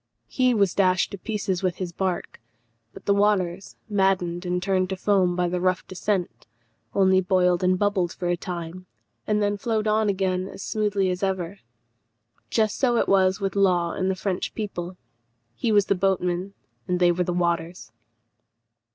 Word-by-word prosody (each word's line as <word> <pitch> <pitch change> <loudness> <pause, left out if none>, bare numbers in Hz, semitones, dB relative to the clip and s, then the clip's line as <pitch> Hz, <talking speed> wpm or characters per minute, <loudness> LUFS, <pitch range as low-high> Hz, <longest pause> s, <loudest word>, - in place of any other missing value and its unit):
He 255 -2 +1
was 200 -4 +2
dashed 185 -2 +2
to 200 - -7
pieces 200 -4 -2
with 185 -3 0
his 180 -2 -4
bark, 185 -9 -3 0.5
but - - -13
the 200 - +3
waters, 200 -3 0
maddened 190 -4 0
and 180 0 0
turned 185 0 0
to 190 - -2
foam 185 -2 +2
by 180 0 +1
the 180 0 -2
rough 185 0 +1
descent, 185 -1 -3 0.5
only 190 -1 +4
boiled 180 -1 +2
and 185 0 +3
bubbled 195 -3 +1
for 180 - -4
a 175 - +2
time, 175 +1 -7 0.4
and 210 -1 +1
then 205 0 0
flowed 220 0 -1
on 215 0 +2
again 185 -1 0
as 195 - -9
smoothly 205 -3 0
as 180 - -4
ever. 190 -1 -2 0.9
Just 215 -2 +1
so 245 -3 +2
it - - +1
was 190 0 +3
with 195 -1 -2
Law 180 -4 +2
and 185 0 -1
the 190 - 0
French 185 -1 -3
people. 185 -4 -5 0.6
He 225 - -1
was 205 -2 +4
the - - +2
boatman, 185 0 -1 0.3
and 180 0 0
they 175 -1 +5
were 180 +1 0
the 180 - -2
waters. 170 0 -2
185 Hz, 175 wpm, -24 LUFS, 180-200 Hz, 0.9 s, they